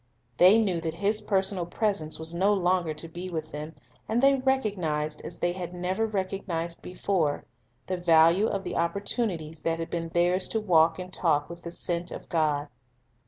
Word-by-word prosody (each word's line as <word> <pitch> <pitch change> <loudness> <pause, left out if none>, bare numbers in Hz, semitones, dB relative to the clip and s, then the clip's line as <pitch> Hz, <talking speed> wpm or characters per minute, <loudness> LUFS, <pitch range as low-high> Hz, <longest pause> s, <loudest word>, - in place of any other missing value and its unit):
They 185 +5 +7
knew 190 -7 +1
that 160 -1 -3
His 205 +4 +1
personal 190 -3 +1
presence 175 -5 -1
was 160 +1 -1
no 195 +4 +3
longer 180 -3 +1
to 155 +2 -5
be 175 +3 -7
with 160 -3 -5
them, 150 +2 -7 0.3
and 225 +2 +1
they 275 +2 +5
recognized, 195 - -1
as - - -8
they 175 - 0
had 180 -1 -6
never 185 +5 -1
recognized 185 -4 -3
before, 180 -5 -1 0.4
the 185 - -2
value 170 +3 +5
of 195 -3 -2
the - - -4
oppor 170 +4 -1
tunities 165 -10 -2
that 165 0 0
had 165 0 -5
been 165 -1 -3
theirs 175 +2 +2
to 220 - -1
walk 165 -5 +4
and 185 0 -8
talk 150 -3 +1
with 170 0 -9
the 170 - -7
Sent 175 0 -2
of - - -8
God. 150 -3 +1
175 Hz, 185 wpm, -27 LUFS, 165-195 Hz, 0.4 s, They